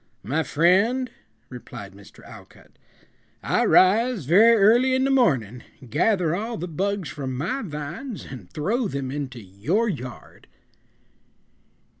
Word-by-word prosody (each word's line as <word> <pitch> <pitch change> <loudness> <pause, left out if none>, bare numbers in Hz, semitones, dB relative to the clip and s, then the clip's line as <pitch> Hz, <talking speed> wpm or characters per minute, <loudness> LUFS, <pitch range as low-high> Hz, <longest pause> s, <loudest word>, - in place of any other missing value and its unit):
"My 135 - -1
friend," 195 - +2 0.4
replied 120 -5 -10
Mr. 100 0 -16
Alcott, - - -15 0.7
"I - - +1
rise 215 - +3
very 215 - +6
early 240 +6 +4
in 260 - +1
the 270 - +1
morning, 130 - +1 0.3
gather 175 - +1
all 225 +4 -4
the 180 - -5
bugs 190 0 -2
from 130 -3 -5
my 255 - -2
vines 175 - -7
and 120 -10 -10
throw 215 - -1
them 135 -6 -4
into 135 -3 -5
your 115 - -1
yard." 130 - -7
175 Hz, 125 wpm, -24 LUFS, -, 0.7 s, very